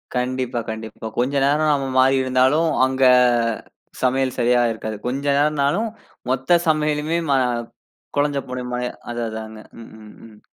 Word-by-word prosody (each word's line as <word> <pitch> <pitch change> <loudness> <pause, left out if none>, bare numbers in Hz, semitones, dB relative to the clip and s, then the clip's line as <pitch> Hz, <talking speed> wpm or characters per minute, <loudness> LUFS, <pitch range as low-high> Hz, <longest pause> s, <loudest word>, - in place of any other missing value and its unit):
கண்டிப்பா. 125 -1 -1
கண்டிப்பா. 110 0 -7
கொஞ்ச 125 +3 0
நேரம் 150 +2 +2
நம்ப 135 -2 -1
மாறி 135 +1 +5
இருந்தாலும், 130 +5 +2 0.2
அங்க 130 0 -1 1.0
சமையல் 130 0 0
சரியா 120 0 +3
இருக்காது. 110 -1 -5
கொஞ்ச 135 +3 -3
நேரம்னாலும் 150 +8 +1 0.4
மொத்த 135 +7 +3
சமையலுமே 155 +1 +1
மா 140 - +4 0.8
கொழஞ்சு 145 -1 +1
போன 125 0 -4
மாரி. 125 0 -2 0.2
அது 120 0 -4
அதாங்க. 110 0 -8 0.2
ம், - - -12
ம், 105 - -13
ம். 105 -2 -17
130 Hz, 135 wpm, -21 LUFS, 120-145 Hz, 1.0 s, மாறி